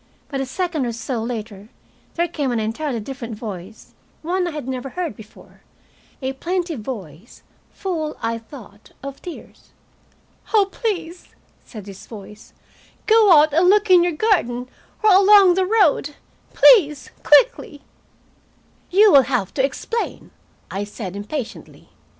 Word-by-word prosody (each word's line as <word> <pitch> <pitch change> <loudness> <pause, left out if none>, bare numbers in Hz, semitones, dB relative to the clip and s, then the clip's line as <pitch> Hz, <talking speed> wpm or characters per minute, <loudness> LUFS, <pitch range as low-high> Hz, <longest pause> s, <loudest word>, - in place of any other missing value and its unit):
But 275 -2 -3
a 270 - -4
second 320 -2 -2
or 235 - -3
so 235 +1 -4
later 220 -3 -6 0.5
there 345 0 0
came 295 -6 -3
an 235 - -1
entirely 230 +4 -3
different 235 0 -7
voice, 205 -2 -9 0.3
one 360 +2 -1
I - - -2
had 300 -5 -7
never 260 0 -4
heard 345 +2 -4
before, 220 -3 -16 0.6
a 265 +1 -2
plaintive 345 0 -3
voice, 210 - -9 0.3
full, 320 -5 -4
I 230 0 -2
thought, 220 -4 -15
of 275 0 -8
tears. 350 - -11 0.9
"Oh, 405 -2 +4
please," 360 -7 -4 0.4
said 215 -5 -11
this 195 -2 -12
voice, 210 -1 -12 0.5
"go 435 -3 +5
out 305 -2 +6
and 345 +4 +4
look 415 0 +3
in 360 -1 +7
your 350 -1 0
garden, 255 - 0 0.4
or 430 - +5
along 390 -1 +7
the 375 +1 0
road. 355 -9 +2 0.4
Please 300 - +5
quickly!" 295 -4 +3 1.1
"You 410 +3 +5
will 280 - +8
have 240 -8 -1
to 265 - 0
explain," 455 - -4 0.4
I 195 +2 -3
said 205 -2 -7
impatiently. 220 +5 -7
280 Hz, 140 wpm, -21 LUFS, 230-360 Hz, 1.1 s, will